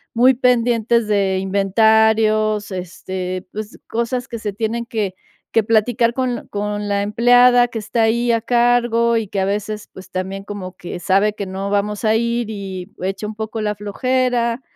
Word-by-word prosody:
muy 255 +3 +6
pendientes 235 -2 +2
de 195 -2 +1
inventarios, 215 +2 +2
este, 185 0 -5
pues, 215 +1 -7
cosas 235 +2 -2
que 230 -2 -5
se 205 -2 -4
tienen 230 +2 -2
que 210 -5 -2 0.4
que 225 - +4
platicar 230 +2 +2
con 255 -2 -2
con 205 0 -3
la 200 0 +1
empleada 245 +3 +5
que 235 - -7
está 225 +2 0
ahí 235 +2 +2
a 230 -1 +1
cargo 235 -1 +2
y 220 -3 -2
que 195 0 -3
a - - +1
veces, 210 +1 -3
pues, 185 -1 -12
también 190 +1 -4
como 190 -3 -7
que 175 0 -7
sabe 195 +4 +2
que 200 -2 -5
no 195 +1 -4
vamos 205 +2 -1
a 215 +1 +3
ir 235 0 0
y 195 -2 -6
echa 195 +3 -3
un 215 - -7
poco 220 0 -4
la 210 -1 -1
flojera, 245 +3 0
215 Hz, 170 wpm, -19 LUFS, 200-235 Hz, 0.4 s, muy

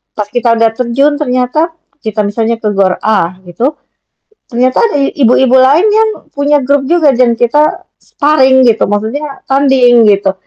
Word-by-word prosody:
pas 210 -1 -4
kita 240 -1 0
udah 225 0 +1
terjun 265 +5 -1
ternyata 295 +4 -1 0.2
kita 215 -3 -3
misalnya 225 +3 -2
ke 215 - -1
GOR 195 -2 0
A 185 -5 0
gitu 235 - -3 0.7
ternyata 255 +1 0
ada 455 -9 0 0.2
ibu-ibu 255 -1 +2
lain 285 +9 +3
yang 440 0 +2 0.2
punya 285 +1 +1
grup 275 0 0
juga 325 -5 +2
dan 240 -2 +1
kita 295 +6 0 0.2
sparing 265 -3 +2
gitu, 225 -4 +1
maksudnya 245 +8 -4
tanding 255 -5 +3
gitu, 200 -1 +1
250 Hz, 150 wpm, -10 LUFS, 225-285 Hz, 0.7 s, lain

